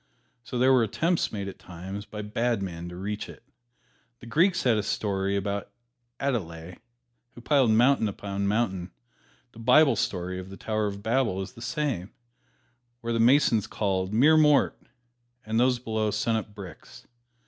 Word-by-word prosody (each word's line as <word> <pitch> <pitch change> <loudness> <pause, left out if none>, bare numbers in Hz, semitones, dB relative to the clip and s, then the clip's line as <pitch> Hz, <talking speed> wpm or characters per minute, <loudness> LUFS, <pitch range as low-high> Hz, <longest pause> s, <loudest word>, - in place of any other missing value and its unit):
So 125 - -5
there 130 +2 +5
were 130 - +5
attempts 165 - 0
made 100 -2 -4
at 100 - -8
times 95 +4 -8
by 105 -1 -6
bad 115 +1 -1
men 85 -2 -6
to 90 - -9
reach 105 +3 -4
it. - - -13 0.8
The - - -12
Greeks 170 +10 +2
had 120 -4 +3
a - - +1
story 100 -1 -1
about 100 0 -2 0.5
the - - -4
Aloidæ 85 -6 -5 0.6
who 120 - -11
piled 135 -2 +3
mountain 120 +2 +4
upon 100 0 -3
mountain; 100 -4 0 0.6
the 115 - -15
Bible 130 +3 +5
story 90 -4 -2
of 95 0 -9
the 95 - -10
Tower 110 -1 -1
of 100 0 -6
Babel 115 -5 +1
is 95 +5 -6
the 115 - -13
same, 130 - -2 0.9
where 115 0 -2
the 115 - 0
masons 120 -3 +4
called, 95 -2 -1
"More 145 +9 +5
mort," 150 -2 +4 0.7
and 110 +1 0
those 125 0 +3
below 110 -3 -1
sent 105 +2 0
up 105 -2 -4
bricks. 95 -6 -11
110 Hz, 170 wpm, -27 LUFS, 95-120 Hz, 0.9 s, there